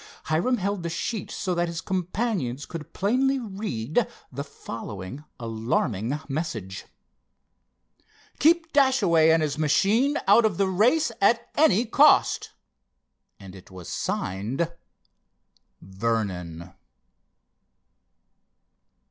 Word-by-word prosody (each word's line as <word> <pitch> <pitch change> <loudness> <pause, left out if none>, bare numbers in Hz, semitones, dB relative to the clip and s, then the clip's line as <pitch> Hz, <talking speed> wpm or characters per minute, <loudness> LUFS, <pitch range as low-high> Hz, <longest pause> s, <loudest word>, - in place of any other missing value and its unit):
Hiram 170 +11 +1
held 200 -1 -2
the 170 - -3
sheet 195 +6 -3
so 185 -3 -2
that 175 0 0
his 170 -1 -4
companions 180 - -2
could 165 -4 -8
plainly 260 +7 +1
read 200 - -2 0.2
the 140 +2 -5
following 115 -3 -8 0.2
alarming 115 +2 -1
message: 130 - -4 1.5
"Keep 325 +1 +3
Dashaway 210 - +4
and 160 0 +4
his 150 0 -2
machine 205 - +2
out 235 - +6
of 210 -6 +1
the 195 - +2
race 235 - +2
at 235 +4 +2
any 240 -7 +4
cost." 285 +6 +4 0.9
And 95 -2 -11
it 95 - -14
was 90 -3 -11
signed: 115 - -2 1.1
"Vernon." 95 -5 -3
170 Hz, 100 wpm, -25 LUFS, -, 1.5 s, out